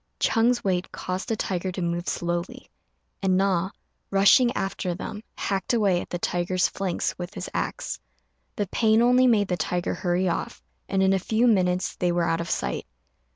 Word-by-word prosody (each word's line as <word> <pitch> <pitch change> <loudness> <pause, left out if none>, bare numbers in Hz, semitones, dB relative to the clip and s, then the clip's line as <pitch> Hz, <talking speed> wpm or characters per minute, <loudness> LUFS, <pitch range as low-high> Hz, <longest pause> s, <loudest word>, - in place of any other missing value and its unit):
Ch'êng's 240 +2 +2
weight 185 -2 -1
caused 185 +1 -4
the 225 - +1
tiger 185 -2 -2
to 185 - -5
move 170 0 -2
slowly; 175 +1 -3 0.5
and 190 -1 +2
Na, 190 -2 +1 0.4
rushing 200 +6 +5
after 185 -2 -2
them, 210 +3 -6 0.2
hacked 195 +4 -1
away 195 -6 +2
at - - -9
the 175 - -2
tiger's 175 +1 0
flanks 190 -3 -2
with 175 +4 -6
his 185 -2 -6
axe. - - -3 0.6
The 205 - -1
pain 220 +3 +3
only 250 +1 +5
made 210 -4 +3
the 180 - 0
tiger 175 +2 -1
hurry 180 +1 0
off, 170 - -3 0.3
and 190 0 +2
in 190 0 +4
a 190 - +2
few 220 +5 +1
minutes 185 -5 +2
they 175 -1 +1
were 175 0 +1
out 165 +1 +1
of 170 - -5
sight. 65 -1 -2
185 Hz, 180 wpm, -25 LUFS, 175-205 Hz, 0.6 s, rushing